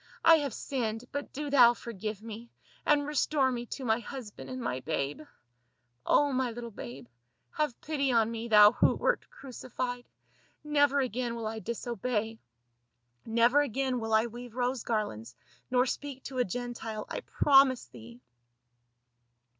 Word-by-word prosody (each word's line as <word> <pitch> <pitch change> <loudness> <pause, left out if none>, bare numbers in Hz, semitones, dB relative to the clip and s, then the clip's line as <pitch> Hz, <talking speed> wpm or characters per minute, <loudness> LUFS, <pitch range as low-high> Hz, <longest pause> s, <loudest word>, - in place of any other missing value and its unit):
I 330 0 +9
have 285 -3 -2
sinned, 230 -3 -3
but 285 0 -5
do 290 0 -5
thou 240 -4 +7
forgive 215 -2 -6
me, 230 +1 -8 0.4
and 290 -1 +4
restore 290 -2 +1
me 240 -1 -4
to 265 - -6
my 220 0 +2
husband 235 -2 -8
and 255 0 -5
my 130 - -2
babe 145 0 -3 0.5
— 120 0 -46
Oh, 290 -1 +4
my 255 -1 +1
little 235 0 -7
babe. 130 - -9 0.5
Have 300 -6 -2
pity 280 -3 0
on 230 -2 +3
me, 230 0 -4
thou 210 -2 +8
who - - +3
wert - - 0
crucified. 250 -1 -6 0.6
Never 290 -2 +3
again 245 -1 -2
will 230 -1 -5
I 220 +1 -3
dis 235 +1 -5
obey; 225 -1 -2 0.9
never 235 +5 +4
again 265 -1 -1
will 225 -1 -4
I 220 +1 +4
weave 240 0 -9
rose 250 0 -1
garlands, 125 - -3 0.3
nor 250 0 +3
speak 270 0 -5
to 260 -2 -5
a - - +5
Gentile. 230 0 -5
I - - -4
promise 270 -3 +4
thee." 115 0 -13
240 Hz, 155 wpm, -30 LUFS, 220-265 Hz, 0.9 s, I